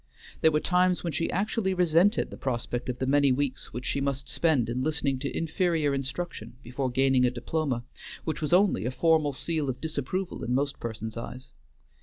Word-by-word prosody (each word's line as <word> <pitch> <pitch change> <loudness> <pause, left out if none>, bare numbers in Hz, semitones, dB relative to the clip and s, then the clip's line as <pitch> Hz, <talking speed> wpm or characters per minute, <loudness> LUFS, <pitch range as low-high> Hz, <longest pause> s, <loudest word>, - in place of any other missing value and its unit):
There 160 - +6
were 150 - +2
times 180 +2 +2
when 170 -3 -2
she 165 - -1
actually 195 0 0
resented 180 +4 +3
the - - -7
prospect 125 -1 -3
of 125 - -2
the 130 - -1
many 140 0 +4
weeks 135 0 -1
which 125 +2 -6
she 140 - 0
must 135 -1 -2
spend 150 -9 +2
in 120 +2 -2
listening 140 -2 0
to 140 +1 -3
inferior 165 -3 +1
instruction 135 -3 -4
before 130 +2 -2
gaining 130 0 +3
a 125 - +4
diploma, 125 0 -2 0.4
which 160 - -3
was 150 - -2
only 185 - +4
a - - +1
formal 155 0 +2
seal 155 +1 -1
of 125 - -3
disapproval 160 +4 -3
in 125 - 0
most 140 +1 -1
persons' 110 -1 -5
eyes. 125 +3 -7
140 Hz, 190 wpm, -28 LUFS, 125-165 Hz, 0.4 s, There